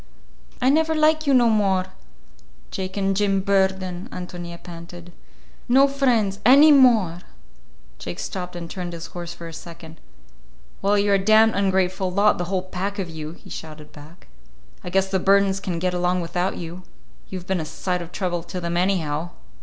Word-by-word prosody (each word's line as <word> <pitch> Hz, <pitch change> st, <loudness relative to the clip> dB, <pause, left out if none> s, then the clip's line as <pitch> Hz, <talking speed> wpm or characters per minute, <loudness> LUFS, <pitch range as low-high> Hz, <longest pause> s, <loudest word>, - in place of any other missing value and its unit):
"I 260 Hz, -, +3 dB
never 320 Hz, +2 st, +2 dB
like 310 Hz, 0 st, +2 dB
you 280 Hz, -, +4 dB
no 240 Hz, -2 st, +5 dB
more, 195 Hz, -4 st, +2 dB, 0.9 s
Jake 190 Hz, +1 st, -5 dB
and 195 Hz, -1 st, 0 dB
Jim 195 Hz, -1 st, +1 dB
Burden," 190 Hz, 0 st, 0 dB
Ántonia 175 Hz, -1 st, -8 dB
panted. 175 Hz, 0 st, -10 dB, 0.6 s
"No 270 Hz, +3 st, +6 dB
friends 240 Hz, -8 st, +1 dB
any 280 Hz, +6 st, +7 dB
more!" 230 Hz, -, +5 dB, 0.8 s
Jake 85 Hz, -, -6 dB
stopped 180 Hz, -1 st, -5 dB
and 170 Hz, -1 st, -6 dB
turned 175 Hz, 0 st, -6 dB
his 165 Hz, -1 st, -7 dB
horse 175 Hz, -1 st, -6 dB
for 170 Hz, -1 st, -9 dB
a 165 Hz, -, -9 dB
second. 165 Hz, 0 st, -11 dB, 0.8 s
"Well, 205 Hz, +1 st, +2 dB
you're 200 Hz, 0 st, +2 dB
a -, -, -8 dB
damned 220 Hz, +2 st, +5 dB
ungrateful 190 Hz, -1 st, 0 dB
lot, 200 Hz, +2 st, +3 dB
the 175 Hz, -, -1 dB
whole 185 Hz, 0 st, -2 dB
pack 190 Hz, +2 st, -4 dB
of 185 Hz, -4 st, -4 dB
you," 155 Hz, 0 st, -7 dB
he -, -, -16 dB
shouted 155 Hz, -1 st, -9 dB
back. 150 Hz, +4 st, -15 dB, 0.6 s
"I -, -, -5 dB
guess 190 Hz, +1 st, +1 dB
the 190 Hz, 0 st, 0 dB
Burdens 195 Hz, 0 st, +3 dB
can 185 Hz, -3 st, -4 dB
get 180 Hz, +1 st, -1 dB
along 180 Hz, 0 st, 0 dB
without 175 Hz, +2 st, -2 dB
you. 170 Hz, +2 st, -7 dB, 0.5 s
You've 185 Hz, -2 st, -6 dB
been 190 Hz, -2 st, -1 dB
a -, -, -3 dB
sight 180 Hz, +3 st, -3 dB
of 170 Hz, 0 st, -9 dB
trouble 175 Hz, -3 st, -2 dB
to 180 Hz, +2 st, -6 dB
them, 170 Hz, 0 st, -3 dB
anyhow!" 175 Hz, -4 st, 0 dB
185 Hz, 175 wpm, -23 LUFS, 175-200 Hz, 0.9 s, any